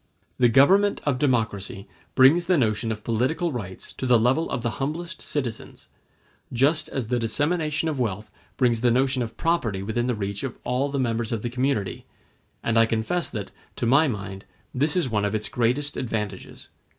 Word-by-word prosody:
]] - - -42
The 120 -1 +5
government 190 - +5
of 140 -4 +1
democracy 110 -6 -1 0.3
brings 155 +7 +6
the 180 -2 +4
notion 110 -2 +1
of 110 -1 -5
political 130 +9 0
rights 100 -8 -7
to 130 - -2
the 125 -1 +6
level 130 +8 +2
of 120 - -3
the 120 +3 -3
humblest 170 +6 -3
citizens, 125 -7 -5 0.6
just 140 +6 +2
as 125 -5 -3
the 125 -1 +1
dissemination 150 +6 0
of 150 -4 -2
wealth 110 -3 -2 0.3
brings 120 -3 +2
the 125 - +4
notion 130 +2 +2
of 115 -1 -5
property 115 - 0
within 120 +4 -1
the 125 - 0
reach 100 -1 -4
of 130 -3 -4
all 130 +3 0
the 140 - -3
members 115 -3 -1
of 115 -3 -2
the 120 - -3
community; 125 -6 -1 0.6
and 115 0 +2
I 115 - +5
confess 115 +11 -1
that, 105 -4 -6 0.2
to - - -2
my 140 +7 +5
mind, 100 -5 -5 0.3
this 150 +4 +1
is 180 -6 +2
one 105 -4 0
of 105 +1 0
its 105 0 -2
greatest 125 +5 0
advantages. 105 -5 -5
125 Hz, 185 wpm, -25 LUFS, 110-145 Hz, 0.6 s, brings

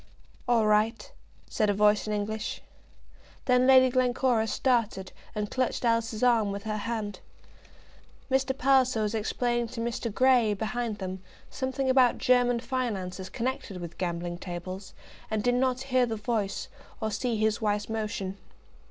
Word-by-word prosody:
"All 235 -3 +3
right," 215 +2 +1 0.4
said 215 -3 0
a 205 - +2
voice 210 +1 +3
in 215 - -1
English. 210 +1 -3 0.8
Then 250 0 +4
Lady 260 -1 +7
Glencora 250 -2 +2
started 230 -7 0 0.2
and 210 -1 -3
clutched 255 -1 -1
Alice's 230 -1 0
arm 230 -5 +3
with 200 0 -5
her 215 -1 -2
hand. 210 -2 -4 1.1
Mr. 265 0 0
Palliser 255 -4 +3
was 210 0 -1
explaining 240 +2 0
to 235 +1 -8
Mr. 230 0 -2
Grey, 245 -3 +4
behind 225 +1 -3
them, 185 -1 -5 0.3
something 265 +1 -2
about 260 -2 +4
German 245 -2 +3
finance 230 -8 -3
as 185 0 -6
connected 230 -5 -3
with 170 -1 -8
gambling 175 -1 -3
tables, 185 +2 -7 0.3
and 215 -1 -1
did 245 - +3
not 255 0 +1
hear 255 -2 +2
the 225 - -2
voice, 210 -2 -2 0.3
or 220 - -2
see 225 +2 -1
his 215 0 +1
wife's 210 -1 0
motion. 210 -3 -3
225 Hz, 150 wpm, -28 LUFS, 205-250 Hz, 1.1 s, Lady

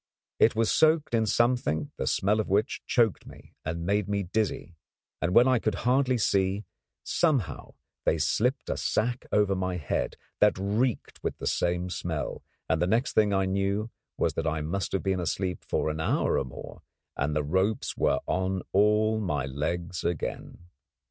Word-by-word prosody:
It - - +5
was 115 0 +2
soaked 155 -3 +3
in 110 -1 +2
something 120 - +1
the - - -2
smell 105 +3 +2
of 110 - -2
which 100 +3 +1
choked 115 -5 +2
me - - -14
and 85 +1 -3
made 100 +1 0
me 100 -1 0
dizzy, 95 -2 -2 0.5
and 90 +1 0
when 120 +2 +7
I 130 -2 +4
could 110 -2 -1
hardly 130 0 +3
see, 100 -1 +1 0.4
somehow 145 - 0 0.3
they 80 - +2
slipped 125 - 0
a - - -2
sack 120 +3 -1
over 105 -2 +3
my 95 -1 -2
head 75 -6 -2 0.2
that - - +4
reeked 105 +6 -1
with - - -2
the - - -6
same 90 +1 0
smell, 80 -4 -3 0.3
and 80 0 +1
the 90 - +2
next 115 +6 +1
thing 105 -1 +3
I 95 -1 +2
knew 100 +3 -1 0.3
was - - +1
that - - -2
I 80 -1 -1
must 85 +4 -2
have 95 - 0
been 95 -1 0
asleep 90 +2 -2
for 80 - -1
an 75 - -5
hour 80 - +1
or - - -2
more 65 - -10 0.3
and 75 +2 -1
the 75 - +1
ropes 95 +8 0
were - - +1
on 95 0 -1
all 105 +2 +3
my 75 -10 -1
legs 85 +6 -3
again. 85 +1 -4
95 Hz, 175 wpm, -28 LUFS, 85-110 Hz, 0.5 s, when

